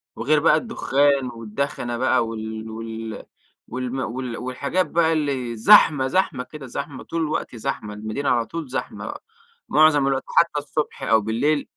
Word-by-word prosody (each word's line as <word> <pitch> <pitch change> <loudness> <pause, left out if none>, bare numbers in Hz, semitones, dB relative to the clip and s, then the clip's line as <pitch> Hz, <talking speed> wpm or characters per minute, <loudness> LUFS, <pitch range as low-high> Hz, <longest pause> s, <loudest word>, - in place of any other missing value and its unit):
وغير 150 +1 +2
بقى 160 - +5
الدخان 140 - +1
والدخنة 120 +2 -3
بقى 125 -2 +2
وال 110 0 -6
وال 110 -1 -6 0.4
والم 125 +2 -4
وال 120 0 -4
والحاجات 140 +9 -1
بقى 165 -1 +2
اللي 135 -6 -1
زحمة 130 +4 +6
زحمة 160 -6 0
كده، 150 0 -10
زحمة، 135 +3 -6
طول 165 0 -3
الوقت 155 -5 -2
زحمة، 105 -1 -4
المدينة 110 +7 -3
على 120 -2 +2
طول 165 -2 -6
زحمة 130 - -4
بقى، - - -7 0.5
معظم 150 -3 +5
الوقت، 135 -1 0
حتى 165 -3 +2
الصبح 150 +1 -4
أو 110 -1 +4
بالليل 140 +8 0
130 Hz, 155 wpm, -23 LUFS, 115-150 Hz, 0.5 s, زحمة